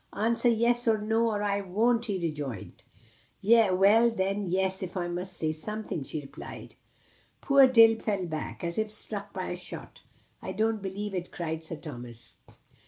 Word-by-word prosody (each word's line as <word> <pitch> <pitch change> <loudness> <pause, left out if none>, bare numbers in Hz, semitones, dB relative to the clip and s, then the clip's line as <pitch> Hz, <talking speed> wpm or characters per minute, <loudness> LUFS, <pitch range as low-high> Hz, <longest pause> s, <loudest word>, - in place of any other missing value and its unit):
"Answer 230 +3 +1
'yes' 235 +1 +2
or 220 -1 +4
'no,' 225 +2 +1
or 210 -1 -2
I 200 -1 0
won't," 230 +5 +1
he 200 -3 -1
rejoined. 150 - -5 0.6
"Well, 215 +1 +5
then, 195 -2 -1
'yes!' 190 +1 0
if 185 0 -5
I 175 -1 -1
must 180 +2 -5
say 155 -1 -1
something," 210 0 -5
she 150 +3 -5
replied. 140 +1 -10 0.7
Poor 275 -1 +6
Dick 225 -3 +6
fell 200 -4 -1
back, 155 0 -5
as 170 +3 -2
if 220 0 -1
struck 205 -1 +1
by 185 -1 -4
a - - -3
shot. 180 - -8 0.4
"I - - -5
don't 220 0 0
believe 200 +1 -5
it," 180 -1 -4
cried 160 -2 -4
Sir 165 +1 -5
Thomas. 120 -6 -10
195 Hz, 170 wpm, -28 LUFS, 175-220 Hz, 0.7 s, Poor